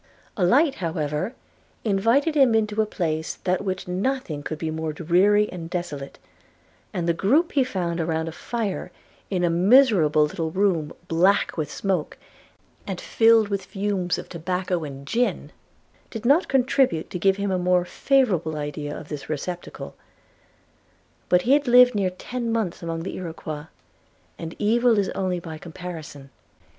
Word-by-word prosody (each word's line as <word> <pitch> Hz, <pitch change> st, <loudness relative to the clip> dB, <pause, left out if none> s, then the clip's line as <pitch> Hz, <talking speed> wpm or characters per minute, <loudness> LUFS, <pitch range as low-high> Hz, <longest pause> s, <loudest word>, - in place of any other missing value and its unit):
A 190 Hz, -, 0 dB
light, 275 Hz, -, +4 dB
however, 160 Hz, -, -2 dB, 0.5 s
invited 230 Hz, +9 st, +2 dB
him 270 Hz, -6 st, +4 dB
into 215 Hz, -1 st, +1 dB
a 215 Hz, -, 0 dB
place 160 Hz, -5 st, -2 dB
than 185 Hz, 0 st, +2 dB
which 185 Hz, -2 st, -4 dB
nothing 185 Hz, -, -2 dB
could 155 Hz, +1 st, -5 dB
be 160 Hz, 0 st, -3 dB
more 160 Hz, -1 st, -3 dB
dreary 190 Hz, +6 st, +3 dB
and 170 Hz, -2 st, -7 dB
desolate, 150 Hz, -6 st, -5 dB, 0.7 s
and 175 Hz, -1 st, -2 dB
the 170 Hz, -, +3 dB
group 270 Hz, -, +2 dB
he 275 Hz, -, +3 dB
found 175 Hz, -8 st, -2 dB
around 160 Hz, 0 st, -1 dB
a -, -, -3 dB
fire 215 Hz, +3 st, -4 dB, 0.4 s
in 185 Hz, -3 st, -1 dB
a 175 Hz, -, +3 dB
miserable 180 Hz, -, +5 dB
little 160 Hz, +2 st, -2 dB
room 175 Hz, -4 st, +1 dB, 0.2 s
black 180 Hz, +5 st, +2 dB
with 155 Hz, -3 st, -3 dB
smoke, 190 Hz, -6 st, -2 dB, 0.7 s
and -, -, -4 dB
filled 225 Hz, -, +4 dB
with 200 Hz, -1 st, -1 dB
the 190 Hz, -, -15 dB
fumes 195 Hz, -2 st, -1 dB
of -, -, -7 dB
tobacco 180 Hz, 0 st, -2 dB
and 140 Hz, -2 st, -8 dB
gin, 240 Hz, -, -1 dB, 0.6 s
did 225 Hz, 0 st, -7 dB
not 290 Hz, +8 st, +4 dB
contribute 260 Hz, -, +1 dB
to 180 Hz, -, -4 dB
give 195 Hz, +2 st, +3 dB
him 200 Hz, -1 st, -1 dB
a 185 Hz, -, 0 dB
more 180 Hz, 0 st, +2 dB
favourable 185 Hz, -, +1 dB
idea 145 Hz, 0 st, -4 dB
of 155 Hz, -, -9 dB
this 150 Hz, -2 st, -7 dB
receptacle: 175 Hz, +4 st, -5 dB, 1.4 s
but 180 Hz, 0 st, +4 dB
he 255 Hz, -, +4 dB
had 290 Hz, -1 st, +2 dB
lived 250 Hz, +1 st, +7 dB
near 200 Hz, -3 st, +1 dB
ten 235 Hz, +6 st, -4 dB
months 220 Hz, -6 st, -2 dB
among 165 Hz, -1 st, -4 dB
the 190 Hz, -, -5 dB
Iroquois; 160 Hz, -4 st, -6 dB, 0.7 s
and 165 Hz, 0 st, -6 dB
evil 230 Hz, +2 st, +3 dB
is 200 Hz, -2 st, +1 dB
only 185 Hz, -2 st, -2 dB
by 160 Hz, -2 st, -8 dB
comparison. 160 Hz, -5 st, -9 dB
180 Hz, 160 wpm, -24 LUFS, 160-220 Hz, 1.4 s, lived